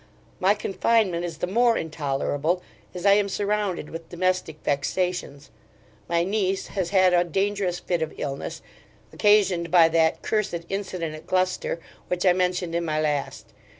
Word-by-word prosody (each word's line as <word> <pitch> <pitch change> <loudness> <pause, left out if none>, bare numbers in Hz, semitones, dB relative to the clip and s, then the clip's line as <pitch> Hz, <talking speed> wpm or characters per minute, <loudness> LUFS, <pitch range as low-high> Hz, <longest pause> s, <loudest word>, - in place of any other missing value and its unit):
My 195 +3 +4
confinement 200 -3 +1
is 165 -3 -6
the 165 - -1
more 230 +5 +3
intolerable, 155 +2 -1 0.3
as 180 +1 -7
I 200 - +7
am 200 0 +2
surrounded 200 -5 -1
with 165 0 -8
domestic 185 -3 -1
vexations. 145 -1 -2 0.6
My 170 0 +2
niece 195 0 -1
has 185 -3 -2
had 185 -1 +4
a 175 0 +5
dangerous 195 +1 -1
fit 175 -1 -2
of 160 - -2
illness, 140 -5 -5 0.5
occasioned 195 -5 +3
by 165 -1 +6
that 160 0 +2
cursed 195 -6 -1
incident 185 -5 -3
at 155 - -11
Gloucester, 185 -2 0 0.3
which 180 +1 -1
I 180 - +6
mentioned 180 -1 0
in 170 0 0
my 155 -2 -1
last. 150 -2 -2
180 Hz, 150 wpm, -25 LUFS, 165-195 Hz, 0.6 s, I